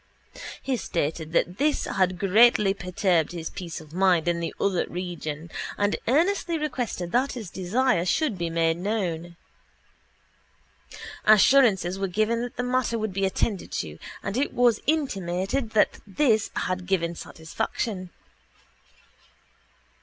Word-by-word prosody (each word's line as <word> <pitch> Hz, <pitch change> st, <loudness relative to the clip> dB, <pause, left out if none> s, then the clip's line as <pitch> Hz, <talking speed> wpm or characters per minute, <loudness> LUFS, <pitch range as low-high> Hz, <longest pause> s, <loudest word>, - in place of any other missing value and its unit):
He 265 Hz, -2 st, 0 dB
stated 160 Hz, -4 st, -3 dB
that 175 Hz, +3 st, +1 dB
this 295 Hz, +1 st, +1 dB
had 185 Hz, -1 st, 0 dB
greatly 200 Hz, +1 st, +5 dB
perturbed 180 Hz, -3 st, 0 dB
his 165 Hz, -2 st, -5 dB
peace 170 Hz, -3 st, -6 dB
of 155 Hz, -1 st, -14 dB
mind 180 Hz, -2 st, +3 dB
in 170 Hz, -1 st, +1 dB
the 170 Hz, -, -3 dB
other 195 Hz, -3 st, +1 dB
region 170 Hz, -3 st, -5 dB, 0.3 s
and 205 Hz, 0 st, +1 dB
earnestly 335 Hz, -, +2 dB
requested 245 Hz, -, -3 dB
that 260 Hz, +5 st, +1 dB
his 220 Hz, -8 st, -7 dB
desire 195 Hz, +2 st, +1 dB
should 245 Hz, -, +1 dB
be 170 Hz, -2 st, -2 dB
made 165 Hz, 0 st, +1 dB
known. 175 Hz, -4 st, -2 dB, 1.9 s
Assurances 210 Hz, -4 st, +5 dB
were 195 Hz, -, 0 dB
given 215 Hz, +5 st, 0 dB
that 245 Hz, 0 st, -5 dB
the 245 Hz, -, -1 dB
matter 250 Hz, -2 st, 0 dB
would 220 Hz, -3 st, -3 dB
be 195 Hz, +1 st, 0 dB
attended 195 Hz, 0 st, -2 dB
to 75 Hz, 0 st, -4 dB, 0.2 s
and 200 Hz, +3 st, -3 dB
it 275 Hz, -, 0 dB
was 240 Hz, -3 st, +3 dB
intimated 215 Hz, -, -1 dB
that -, -, +3 dB
this 220 Hz, 0 st, +2 dB
had 185 Hz, -1 st, -2 dB
given 170 Hz, -3 st, 0 dB
satisfaction. 185 Hz, +4 st, -4 dB
195 Hz, 130 wpm, -25 LUFS, 175-235 Hz, 1.9 s, greatly